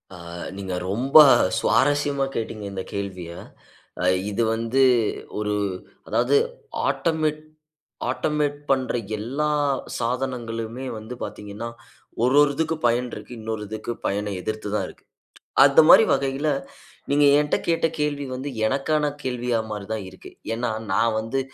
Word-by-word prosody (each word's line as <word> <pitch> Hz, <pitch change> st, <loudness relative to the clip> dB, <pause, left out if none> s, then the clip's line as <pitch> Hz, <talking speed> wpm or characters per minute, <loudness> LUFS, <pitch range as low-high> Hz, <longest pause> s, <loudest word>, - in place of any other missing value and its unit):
ஆ -, -, -10 dB, 0.4 s
நீங்க 95 Hz, -2 st, -4 dB, 0.2 s
ரொம்ப 125 Hz, +8 st, -2 dB, 0.4 s
சுவாரஸ்யமா 145 Hz, -1 st, +2 dB
கேட்டீங்க 110 Hz, -2 st, -4 dB
இந்த 95 Hz, -1 st, -4 dB
கேள்விய. 95 Hz, -4 st, -5 dB, 0.7 s
அ -, -, -1 dB, 0.3 s
இது 115 Hz, +3 st, 0 dB
வந்து 115 Hz, +4 st, 0 dB, 0.6 s
ஒரு 105 Hz, 0 st, -1 dB, 0.5 s
அதாவது -, -, +2 dB, 0.5 s
ஆட்டமெட் 155 Hz, -2 st, 0 dB, 0.7 s
ஆட்டோமேட் 150 Hz, -2 st, 0 dB
பண்ற 130 Hz, -2 st, +1 dB, 0.2 s
எல்லா 135 Hz, +8 st, -2 dB, 0.5 s
சாதனங்களுமே 120 Hz, -1 st, -3 dB
வந்து 110 Hz, +3 st, -8 dB
பார்த்தீங்கன்னா, 105 Hz, +3 st, -6 dB, 0.5 s
ஒரு, 125 Hz, +3 st, +3 dB
ஒரு 145 Hz, -1 st, +4 dB
இதுக்கு 160 Hz, +1 st, 0 dB
பயன் 120 Hz, +1 st, +1 dB
இருக்கு. -, -, -8 dB
இன்னொரு 110 Hz, -1 st, -4 dB
இதுக்கு 110 Hz, +2 st, -5 dB, 0.2 s
பயன 105 Hz, +1 st, -2 dB
எதிர்த்துதான் 105 Hz, 0 st, -2 dB
இருக்கு. -, -, -15 dB, 0.6 s
அந்த -, -, +7 dB
மாதிரி -, -, +9 dB
வகையில, 135 Hz, +2 st, 0 dB, 0.6 s
நீங்க 145 Hz, +1 st, +4 dB
ஏன்ட்ட 150 Hz, 0 st, +2 dB
கேட்ட 165 Hz, -1 st, +2 dB
கேள்வி 145 Hz, -1 st, -1 dB
வந்து 135 Hz, +3 st, -4 dB, 0.2 s
எனக்கான 140 Hz, +5 st, +1 dB, 0.2 s
கேள்வியாமாரிதான் 110 Hz, -4 st, -2 dB
இருக்கு. 95 Hz, -, -13 dB, 0.2 s
ஏன்னா, 120 Hz, +1 st, -1 dB, 0.2 s
"நான் 115 Hz, -1 st, +2 dB
வந்து 115 Hz, +5 st, -2 dB
120 Hz, 120 wpm, -24 LUFS, 110-140 Hz, 0.7 s, மாதிரி